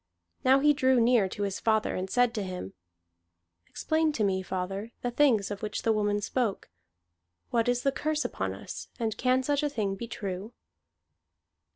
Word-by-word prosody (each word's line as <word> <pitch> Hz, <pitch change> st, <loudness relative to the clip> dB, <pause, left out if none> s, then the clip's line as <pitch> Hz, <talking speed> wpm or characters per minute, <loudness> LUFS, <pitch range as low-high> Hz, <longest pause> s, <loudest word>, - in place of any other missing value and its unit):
Now 260 Hz, +1 st, +6 dB
he 295 Hz, +1 st, +5 dB
drew 260 Hz, -3 st, +3 dB
near 230 Hz, -4 st, +4 dB
to 205 Hz, -, -4 dB
his 200 Hz, -1 st, -2 dB
father, 220 Hz, -1 st, +1 dB
and 185 Hz, +1 st, -3 dB
said 245 Hz, +1 st, +3 dB
to 215 Hz, -, -2 dB
him: 180 Hz, -, -5 dB, 0.9 s
"Explain 315 Hz, 0 st, 0 dB
to 225 Hz, -, 0 dB
me, 190 Hz, -2 st, +1 dB
father, 190 Hz, +4 st, -4 dB
the 245 Hz, -, -1 dB
things 235 Hz, -7 st, +3 dB
of 205 Hz, -, -5 dB
which 210 Hz, -1 st, -3 dB
the 225 Hz, -, +3 dB
woman 205 Hz, -1 st, +1 dB
spoke. 215 Hz, -, -2 dB, 0.8 s
What 235 Hz, 0 st, +2 dB
is 245 Hz, 0 st, +1 dB
the 275 Hz, -, +3 dB
curse 305 Hz, +2 st, -1 dB
upon -, -, -2 dB
us, -, -, -8 dB
and 225 Hz, -2 st, -1 dB
can 255 Hz, +1 st, +2 dB
such 285 Hz, +2 st, +1 dB
a 295 Hz, -, 0 dB
thing 210 Hz, -8 st, -1 dB
be 215 Hz, +4 st, -6 dB
true?" 200 Hz, 0 st, -5 dB
225 Hz, 180 wpm, -28 LUFS, 200-255 Hz, 0.9 s, Now